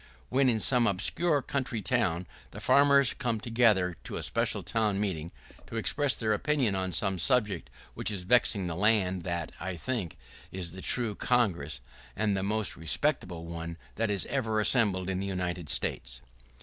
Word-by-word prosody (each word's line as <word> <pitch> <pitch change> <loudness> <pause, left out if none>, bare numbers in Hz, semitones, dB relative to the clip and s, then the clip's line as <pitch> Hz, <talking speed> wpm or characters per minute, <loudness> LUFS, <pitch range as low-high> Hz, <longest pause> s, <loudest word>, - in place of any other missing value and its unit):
When, 130 +1 +3
in 115 -2 +1
some 120 +1 +4
obscure 145 - +2
country 125 -6 -2
town, 90 -9 0 0.2
the - - -9
farmers 140 -2 +5
come 115 -3 -2
together 110 -7 +2
to - - -6
a - - -3
special - - 0
town 105 -3 0
meeting, 85 -6 -2 0.4
to - - -8
express 140 +5 +1
their 110 -2 0
opinion 130 -1 +1
on 95 -1 -1
some 95 +2 0
subject 105 -5 +1 0.2
which - - -3
is 100 -4 -4
vexing 100 -2 +3
the 85 -2 -3
land, 95 -2 +2
that, 85 -2 -3
I 90 0 -4
think, 105 - -3 0.3
is 90 -3 -4
the 95 +2 -9
true 120 -1 0
Congress, 90 - 0 0.3
and 105 -1 +1
the 95 - -1
most 105 +1 0
respectable 85 - -1
one 85 0 -6 0.2
that 115 0 -1
is 100 -2 +1
ever 115 -6 -1
assembled 105 -5 +2
in 95 -1 -1
the 100 - -3
United 90 -4 -3
States. 65 -1 -2
100 Hz, 170 wpm, -29 LUFS, 90-120 Hz, 0.4 s, farmers